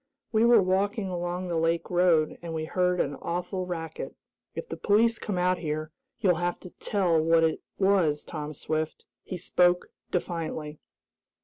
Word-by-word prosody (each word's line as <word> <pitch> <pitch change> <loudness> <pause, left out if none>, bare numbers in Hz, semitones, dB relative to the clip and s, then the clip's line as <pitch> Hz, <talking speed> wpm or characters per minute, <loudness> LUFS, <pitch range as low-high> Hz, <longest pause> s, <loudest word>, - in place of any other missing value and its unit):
"We 220 0 +4
were 235 -4 +6
walking 195 +2 0
along 175 0 -3
the 170 -2 -1
lake 165 +2 0
road, 175 -3 +3
and 165 -1 -5
we 155 0 -2
heard 180 +1 +1
an 140 - 0
awful 180 +2 -3
racket. 165 -3 -5 0.4
If 480 - -5
the - - -5
police 225 +3 +3
come 205 -4 -3
out 180 0 +2
here, 155 -1 -3 0.3
you'll 180 -6 +4
have 175 0 -1
to 180 - -10
tell 180 -6 +1
what 165 +1 +4
it 160 -1 +1 0.2
was, 185 -7 +3
Tom 150 -2 -6
Swift." 155 +2 -3 0.2
He 185 - -6
spoke 175 +1 +2 0.2
defiantly. 160 -4 -3
175 Hz, 165 wpm, -28 LUFS, 160-185 Hz, 0.4 s, were